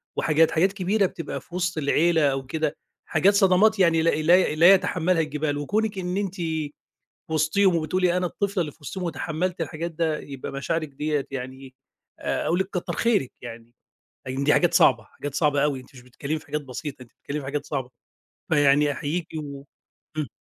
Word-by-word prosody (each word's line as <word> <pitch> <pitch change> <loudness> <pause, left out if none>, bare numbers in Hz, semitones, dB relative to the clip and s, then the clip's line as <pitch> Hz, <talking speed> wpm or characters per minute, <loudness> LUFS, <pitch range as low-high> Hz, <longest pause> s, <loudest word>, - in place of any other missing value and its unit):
وحاجات 160 +1 +3
حاجات 185 +5 +2
كبيرة 200 +1 +1
بتبقى 165 -3 -5
في 175 - -13
وسط 180 -2 -1
العيلة 160 +3 +2
أو 135 0 -3
كده، 155 +1 -2 0.3
حاجات 180 +5 +3
صدمات 200 +2 +4
يعني 165 -3 +4
لا 165 - +3
لا 165 +1 +3
لا 175 +5 +8
يتحمّلها 180 -2 +2
الجبال 150 -1 -2
وكونِك 205 +7 -1
إن 180 +1 -2
أنتِ 195 -2 -2 1.0
وسطيهم 170 +4 +3
وبتقولي 180 +2 +1
"أنا 180 0 +1
الطفلة 200 +1 -2
اللي 150 -4 -2
في - - -27
وسطيهم." 180 +6 -6
وتحمّلت 170 +1 -2
الحاجات 165 +2 -3
ده 160 -1 -1
يبقى 135 -2 -7
مشاعرك 155 +3 -2
ديّة 145 0 -2
يعني 130 0 -7 0.4
آآ - - -2
أقول 175 - +1
لِك 190 - 0
كتّر 175 -1 -3
خيرك 215 - +1
يعني، 115 0 -10 0.5
يعني 135 +2 -2
دي 150 - +4
حاجات - - +3
صعبة، - - +5
حاجات 145 -1 -8
صعبة 145 -2 +2
أوي 140 -3 0
أنتِ 130 +2 -18
مش 125 - -12
بتتكلّمي 140 +5 -4
في 155 - -18
حاجات 150 +1 -2
بسيطة 130 0 -7
أنتِ 120 - -16
بتتكلّمي 150 +1 -6
في - - -9
حاجات 145 +1 -3
صعبة، 130 -4 -3 0.6
فيعني 145 -1 +4
أحيّيكِ 160 +4 -3 0.2
و 140 -1 -8 0.5
امم. 150 -4 -2
155 Hz, 180 wpm, -25 LUFS, 145-180 Hz, 1.0 s, لا